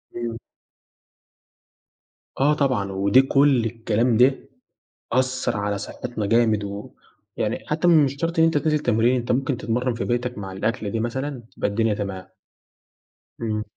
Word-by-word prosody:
إمم. 120 -1 -4 2.0
آه 145 +3 +4
طبعًا، 125 -10 0
ودي 100 +6 +4
كل 135 -3 +3
الكلام 115 +1 0
ده 130 +2 +4 0.7
أثّر 130 -3 0
على 100 0 -2
صحِّتنا 110 +1 -5
جامد 110 -1 +2
و 100 +1 -7 0.5
يعني - - -2
حتّى 155 +3 +1
مش 145 -5 +4
شرط 165 0 -2
إن 160 - +6
أنت 165 -2 +3
تنزل 150 +1 +1
تمرين، 120 -1 +2
أنت 120 0 -1
ممكن 135 +1 0
تتمرَّن 125 +1 -1
في 115 - -3
بيتك 125 0 -2
مع 95 -2 -6
الأكلة 105 +2 -2
دي 115 +2 -2
مثلًا 130 +3 -3
تبقى - - 0
الدنيا 110 +1 +1
تمام. 100 -2 -5 1.2
إمم. 110 -2 -2
120 Hz, 145 wpm, -23 LUFS, 105-135 Hz, 2.0 s, إن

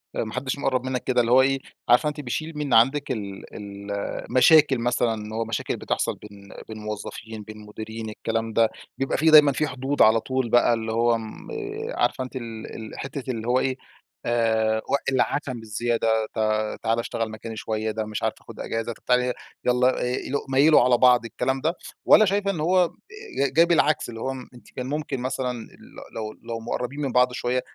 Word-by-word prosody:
آآ، - - 0
ما 110 - -7
حدش 130 +1 -2
مقرب 130 -2 0
منّك 130 -1 -2
كده، 125 -1 +2
اللي 115 0 0
هو 130 - +7
إيه 135 0 +2 0.3
عارفة 130 +6 +5
أنتِ 150 0 -6
بيشيل 155 +4 -4
من 145 -2 -2
عندِك 135 +5 +4
ال 100 -5 -6
ال 100 0 -8
المشاكل 135 +7 +4
مثلًا 120 -1 +1
إن 105 0 -7
هو 115 0 -1
مشاكل 110 -1 -2
بتحصل - - -1
بين 100 -1 -14 0.2
بين 110 - -8
موظفين، 105 +1 -7
بين 110 +1 -10
مديرين، 110 +1 -7
الكلام 115 +1 -3
ده، 115 -1 +4 0.3
بيبقى 135 - -1
في 160 +1 +4
دايمًا 150 -2 +9
في 150 +2 0
حدود 135 +2 -2
على 110 +1 +6
طول 130 +1 -2
بقى 120 0 +4
اللي 115 -1 -2
هو 115 +1 +3
آمم 110 -1 -7 0.5
عارفة 130 - +1
أنتِ 130 - -9
ال 115 -3 -7
ال 110 -1 -8
حتّة 135 -1 -4
اللي 115 -1 -5
هو 125 +1 +3
إيه، 130 -1 -1 0.5
آآ 110 -2 +2
وق - - +3
العشم 130 0 0
الزيادة 110 0 0
ت - - -17 0.5
تعالَ 115 +1 +1
اشتغل 115 -1 -2
مكاني 110 +1 -7
شويّة، 110 0 -2
ده 110 0 -3
مش 105 0 -5
عارفة - - 0
آخد - - -12
أجازة 115 +1 -3
طب - - -23
تعالي 125 0 +2 0.3
يلَّا 125 +1 +3
إ - - 0 0.3
ميل 140 - -2
ميلوا 140 +4 +6
على 125 0 +4
بعض، 125 -1 +5
الكلام 130 +3 -2
ده، 160 +4 +1 0.3
والَّا 215 - +7
شايفة 200 0 +1
إن 170 - -5
هو 180 +3 +4
أ - - -5 0.6
ج - - -17
جاي 165 +3 +6
بالعكس، 160 -5 +2
اللي 115 -1 -8
هو 135 - -2
م 130 -2 -9
أنتِ 120 - -16
كان 125 - -5
ممكن 145 -1 -3
مثلًا 130 0 -2
ل 110 - -13
لو 110 -1 -4
لو 115 0 -5
مقربين 125 +4 -4
من 135 - -1
بعض 125 0 +4
شويّة 125 +1 -1
120 Hz, 205 wpm, -24 LUFS, 110-135 Hz, 0.6 s, دايمًا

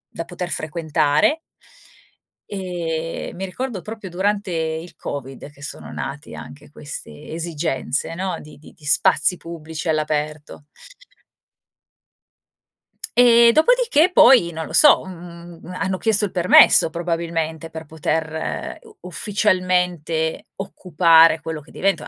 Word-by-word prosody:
da 165 - -4
poter 180 +1 -6
frequentare 155 - 0 1.1
ehm, 170 -5 -4
mi 190 +2 -4
ricordo 215 +1 -5
proprio 215 -3 -8
durante 200 +2 -1
il 160 +1 -4
covid 135 0 -7
che 145 - -19
sono - - -6
nate 145 +1 -7
anche 140 - -12
queste 145 - -9
esigenze, 160 -3 -3
no, 180 0 -3
di 155 - -14
di 150 - -16
di 150 - -16
spazi 145 +3 +3
pubblici 160 -1 -7
all'aperto 150 -1 -3 2.5
ehm, 235 -1 +6
dopodiché 375 - +3
poi, 245 - +6
non 160 -1 -5
lo - - -10
so, 295 - +6
mhmm, 170 -2 -11 0.2
hanno 190 -1 -1
chiesto 215 0 +2
il 195 - -6
permesso 180 -2 +6
probabilmente 165 -1 -3
per 160 0 -9
poter 160 +1 -3
u 435 -2 -18
ufficialmente 180 -5 0
occupare 165 -4 +4
quello 160 -1 -6
che 150 - -19
diventa 195 0 -1
170 Hz, 115 wpm, -21 LUFS, 160-190 Hz, 2.5 s, ehm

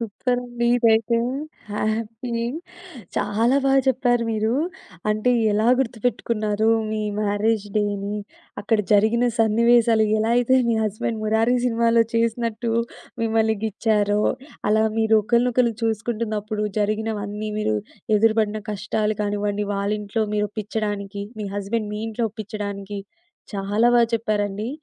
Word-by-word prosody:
సూపరండి 240 +2 -2
ఇదైతే. 230 -1 +3 0.5
హ్యాపీ. 220 +3 -2 0.8
చాలా 230 +6 +2
బాగా 270 0 +5
చెప్పారు 245 -2 +2
మీరు. 220 +1 0 0.6
అంటే 215 +4 +1 0.2
ఎలా 215 +2 +1
గుర్తుపెట్టుకున్నారు, 225 -3 0 0.2
మీ 215 0 -2 0.2
మ్యారేజ్ 210 +1 0
డేని, 205 0 -1 0.4
అక్కడ 215 +2 +1
జరిగిన 220 +4 +4
సన్నివేశాలు, 230 0 +4
ఎలా 220 +1 +1
అయితే 245 +2 +3
మీ 230 - +3
హస్బెండ్ 215 +1 -2
'మురారి' 220 +3 +2
సినిమాలో 230 -1 +3
చేసినట్టు 230 0 0 0.5
మిమ్మల్ని 220 -1 +2
గిచ్చారో, 210 -1 +1 0.5
అలా 215 +1 +4 0.2
మీరు 220 0 +4
ఒకళ్ళినొకళ్ళు 235 +1 +2
చూసుకుంటున్నప్పుడు, 215 -1 -2
జరిగినవన్నీ 210 0 -2
మీరు 110 - 0 0.4
ఎదురుపడిన 215 0 +2
కష్టాలు 210 +1 -1
కానివ్వండి, 205 0 -1
వాళ్ళ 200 +1 -1
ఇంట్లో 210 +2 -1
మీరు 210 0 +1
ఒప్పించడానికి, 205 -1 -4 0.2
మీ 210 - -3
హస్బెండ్ 205 +2 -2
మీ 210 - -4
ఇంట్లో 225 +1 -2
ఒప్పించడానికి, 205 -2 -5 0.6
చాలా 205 +3 +1
బా 240 - +6
చెప్పారండి. 210 -1 -1
220 Hz, 110 wpm, -23 LUFS, 210-230 Hz, 0.8 s, బా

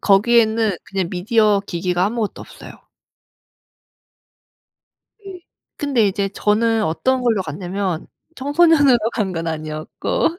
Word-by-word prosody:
거기에는 220 0 +3
그냥 190 -3 -3
미디어 210 +2 +2
기기가 180 0 -1
아무것도 220 -1 -3
없어요. - - -12 2.5
예. 370 -2 -9 0.4
근데 270 -8 +1
이제 195 0 -1
저는 220 +3 +1
어떤 255 +11 0
걸로 225 -5 +1
갔냐면 180 +2 -4 0.3
청소년으로 290 -2 +4
간 200 -5 -2
건 165 -1 -4
아니었고 155 - -3
210 Hz, 255 characters per minute, -19 LUFS, 185-240 Hz, 2.5 s, 청소년으로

